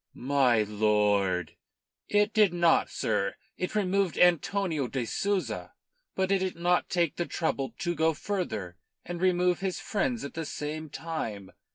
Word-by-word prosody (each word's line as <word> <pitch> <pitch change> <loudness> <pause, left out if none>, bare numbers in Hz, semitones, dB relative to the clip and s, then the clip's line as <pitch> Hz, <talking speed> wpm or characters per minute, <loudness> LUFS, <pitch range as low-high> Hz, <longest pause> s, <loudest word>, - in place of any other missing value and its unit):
"My 125 -4 +3
lord!" 105 -5 +1 0.6
"It 210 +1 +2
did 205 -5 +4
not, 170 -1 +3
sir. 100 0 -1 0.2
It 180 +3 -4
removed 195 -3 +1
Antonio 175 -4 +2
de 125 -1 -2
Souza, 200 - -2 0.4
but 190 0 0
it 195 - +3
did 185 -1 -2
not 175 +1 +1
take 170 -4 0
the 175 - -1
trouble 140 -5 -2
to 175 - -1
go 160 0 +2
further 110 - -3 0.3
and 175 0 -5
remove 180 -1 +2
his 190 -2 -2
friends 230 +2 -1
at 140 - -7
the 165 - -3
same 155 +1 -5
time. 115 - -5
165 Hz, 150 wpm, -28 LUFS, 120-185 Hz, 0.6 s, did